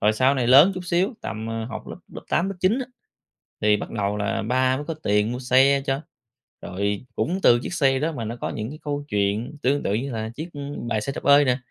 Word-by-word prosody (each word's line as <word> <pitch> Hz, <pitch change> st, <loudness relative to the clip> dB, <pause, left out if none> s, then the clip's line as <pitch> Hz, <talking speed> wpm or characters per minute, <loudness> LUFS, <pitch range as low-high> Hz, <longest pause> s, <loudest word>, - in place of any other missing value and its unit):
rồi 105 Hz, +1 st, +3 dB
sau 130 Hz, +5 st, +3 dB
này 125 Hz, -3 st, 0 dB
lớn 145 Hz, +10 st, +7 dB
chút 185 Hz, -, -4 dB
xíu 180 Hz, +7 st, 0 dB
tầm, 110 Hz, +1 st, -5 dB
ờ, 115 Hz, 0 st, -3 dB
học 115 Hz, -, -7 dB
lớp -, -, -7 dB, 0.2 s
lớp -, -, -8 dB
8, 180 Hz, +3 st, +1 dB
lớp 195 Hz, -, -4 dB
9 200 Hz, +7 st, +2 dB
á 260 Hz, -, -4 dB, 0.8 s
thì 105 Hz, 0 st, +4 dB
bắt -, -, -6 dB
đầu 105 Hz, -1 st, -1 dB
là 105 Hz, -1 st, -1 dB
ba 130 Hz, +3 st, +1 dB
mới 145 Hz, -, -6 dB
có 165 Hz, -, -3 dB
tiền 105 Hz, +2 st, +2 dB
mua 125 Hz, -, -4 dB
xe 135 Hz, +2 st, +4 dB
cho, 135 Hz, 0 st, -1 dB, 0.6 s
rồi 100 Hz, +4 st, -3 dB
cũng 180 Hz, +4 st, -1 dB
từ 120 Hz, 0 st, +6 dB
chiếc -, -, -5 dB
xe 135 Hz, -4 st, +2 dB
đó 160 Hz, +3 st, 0 dB
mà 120 Hz, -7 st, -5 dB
nó 115 Hz, +2 st, -4 dB
có -, -, -2 dB
những 110 Hz, +1 st, -4 dB
cái 155 Hz, +2 st, -9 dB
câu 145 Hz, -1 st, -3 dB
chuyện 105 Hz, +7 st, -1 dB
tương 140 Hz, +3 st, +1 dB
tự 100 Hz, -, 0 dB
như 125 Hz, +5 st, -2 dB
là 110 Hz, -1 st, -4 dB
chiếc, 160 Hz, +3 st, -6 dB
ơ, 145 Hz, -, -7 dB, 0.3 s
bài 110 Hz, -2 st, 0 dB
Xe 135 Hz, -, -3 dB
đạp -, -, -6 dB
ơi 145 Hz, 0 st, +6 dB
nè, 125 Hz, -1 st, +2 dB
130 Hz, 255 wpm, -23 LUFS, 110-145 Hz, 0.8 s, lớn